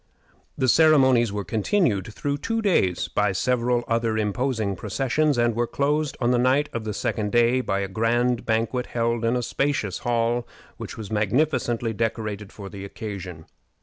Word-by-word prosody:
The 130 -3 +1
ceremonies 130 -6 +5
were 100 0 -3
continued 110 - 0
through 140 +6 -3
two 225 +8 -1
days 95 - +2
by - - 0
several 120 +3 +1
other 115 -1 0
imposing 110 -1 -1
processions, 135 +7 0
and 120 -1 +2
were 120 0 0
closed 145 +2 0
on 120 - +2
the 125 - +3
night 135 +4 +2
of 115 -2 -4
the 105 - -3
second 105 -2 -2
day 120 +2 +3
by 100 -5 -1
a 100 - -2
grand 120 +4 +1
banquet 115 +2 -1
held 115 0 -1
in 115 +2 +2
a 125 - -1
spacious 135 -7 -1
hall 120 0 0 0.3
which - - -7
was 110 -1 -7
magnificently 115 +1 0
decorated 110 -2 -3
for 100 -2 -9
the 100 0 -8
occasion. 95 -5 -7
115 Hz, 165 wpm, -24 LUFS, 105-130 Hz, 0.3 s, ceremonies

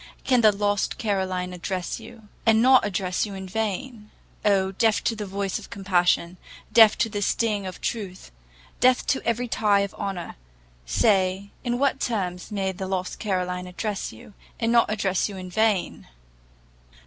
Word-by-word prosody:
can 255 -3 +3
the 215 -2 +7
lost 205 0 0
Caroline 185 -4 -1
address 180 0 -4
you, 235 -2 -13 0.2
and 220 -1 +4
not 255 +2 +6
address 185 -2 -1
you 200 - -7
in 190 0 -7
vain? 220 +2 -4 0.3
Oh, 195 -2 +2
deaf 220 +2 +2
to 230 - 0
the 210 -2 -5
voice 195 0 -2
of - - -12
compassion 180 -2 +1 0.4
deaf 220 -2 +7
to 230 - +2
the 205 -2 -4
sting 205 -1 0
of 185 - -8
truth 195 - -5 0.5
deaf 255 +1 +4
to 265 - 0
every 235 +1 0
tie 205 -3 +2
of 200 -1 -3
honour 190 - -5 0.5
say, 190 - +2
in 240 -1 -1
what 275 0 +1
terms 185 -6 -3
may 195 -2 -1
the 190 0 -6
lost 185 -1 -3
Caroline 180 -3 -2
address 200 +2 -4
you, 110 - -14 0.3
and 230 -1 +1
not 235 -2 +4
address 200 -2 0
you 200 - -8
in 185 -1 -8
vain! 215 -2 0
200 Hz, 165 wpm, -25 LUFS, 185-225 Hz, 0.5 s, the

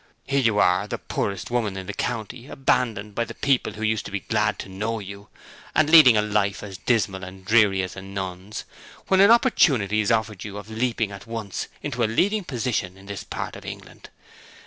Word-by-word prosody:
Here 140 0 +1
you 115 -4 +2
are, 90 -3 +3
the - - -3
poorest 100 +2 -3
woman 110 -5 -1
in 95 - -6
the - - -5
county, 115 +3 -4
abandoned 115 -7 0
by 115 - 0
people 120 +3 0
who 110 - -7
used 110 -1 +1
to - - -7
be 100 -1 -3
glad - - 0
to - - -7
know 105 +4 -3
you, 100 0 -9 0.5
and 155 0 +3
leading 150 -9 +9
a 105 - +3
life 105 -2 0
as 95 -3 -8
dismal 100 -6 0
and 95 +1 -10
dreary 105 -3 +4
as 95 - -5
a 95 - -7
nun's, 95 +1 -6 0.5
when 190 - +4
an 200 +2 +7
opportunity 135 - +4
is 105 - 0
offered 110 -4 0
you 100 -1 -7
of 105 +1 -9
leaping 115 -2 -1
at 100 +2 -10
once 110 -4 -4 0.2
into 120 0 -2
a 110 - +2
leading 200 - +1
position 120 - -2
in 95 - -15
this 100 -1 -6
part - - -5
of - - -10
England. - - -10
105 Hz, 205 wpm, -24 LUFS, 100-120 Hz, 0.5 s, leading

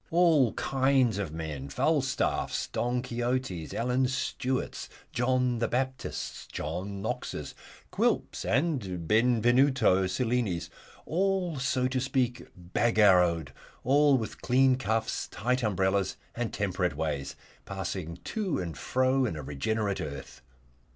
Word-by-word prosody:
All 165 - +4
kinds 130 -5 +2
of 95 -7 -3
men 75 -4 -5
Falstaffs, - - 0
Don 125 +1 -1
Quixotes, 120 -9 -2
Alan 125 +2 +1
Stewarts, 130 0 -2 0.2
John 125 0 +1
the 115 - +1
Baptists, 130 +2 -3
John 95 +6 -4
Knoxes, 110 - -4 0.4
Quilps, - - 0
and 115 - -1
Benvenuto 120 -3 +4
Cellinis 115 -5 -1 0.3
all, 180 -2 0
so 130 -1 +1
to 130 0 -1
speak, 125 -2 -1
Bagarrowed, 90 - +3 0.3
all 140 +1 +5
with 110 -3 -5
clean 130 +1 +4
cuffs, 110 -2 -1
tight 125 +4 -1
umbrellas, 95 -2 +1 0.2
and 120 -1 -3
temperate 95 -5 -1
ways, 75 -3 -2 0.3
passing 95 -3 -4
to 195 - -2
and 85 - -4
fro 130 - +1
in 95 - -3
a 75 - -6
regenerate 100 +9 -1
earth. 70 -4 -7
120 Hz, 115 wpm, -29 LUFS, 95-130 Hz, 0.4 s, all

